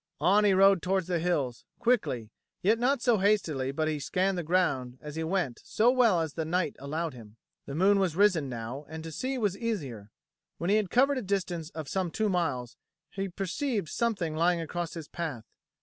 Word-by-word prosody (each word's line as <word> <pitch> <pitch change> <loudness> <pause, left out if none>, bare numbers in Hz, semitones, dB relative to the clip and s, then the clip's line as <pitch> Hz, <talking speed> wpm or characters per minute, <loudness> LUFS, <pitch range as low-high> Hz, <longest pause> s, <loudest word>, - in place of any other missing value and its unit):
On 205 +3 +4
he 205 - +5
rode 195 -1 +6
towards 190 +1 0
the 175 -1 0
hills, 145 -8 -1
quickly, 200 - 0 0.3
yet 220 +5 +3
not 255 +1 +1
so 235 -5 +3
hastily 165 -10 +1
but 155 +3 -1
that 155 - 0
he 150 - -2
scanned 185 +6 0
the 175 - -1
ground 145 -8 0
as 150 0 -8
he 160 - -2
went 165 -7 -1
so 230 +3 +3
well 230 -9 +4
as 160 -2 -3
the 160 - -2
night 170 -1 -1
allowed 155 +3 -3
him. 110 -4 -13 0.3
The 140 - -5
moon 195 +4 +4
was 185 -5 +1
risen 180 -8 +3
now 120 +3 -5
and 160 0 -7
to 160 - -7
see 260 - -2
was 205 -5 0
easier. 145 - -4 0.5
When 175 +3 -1
he 210 - +5
had 210 -4 0
covered 270 +4 +3
a - - -4
distance 180 -5 -2
of 160 -3 -5
some 185 +1 -1
two 215 +5 0
miles, 140 -10 -1 0.3
he 195 0 -3
perceived 195 - -2
something 195 -9 -1
lying 170 +2 +2
across 170 +1 -4
his 160 -3 -7
path. 150 -10 -5
175 Hz, 205 wpm, -29 LUFS, 150-200 Hz, 0.5 s, rode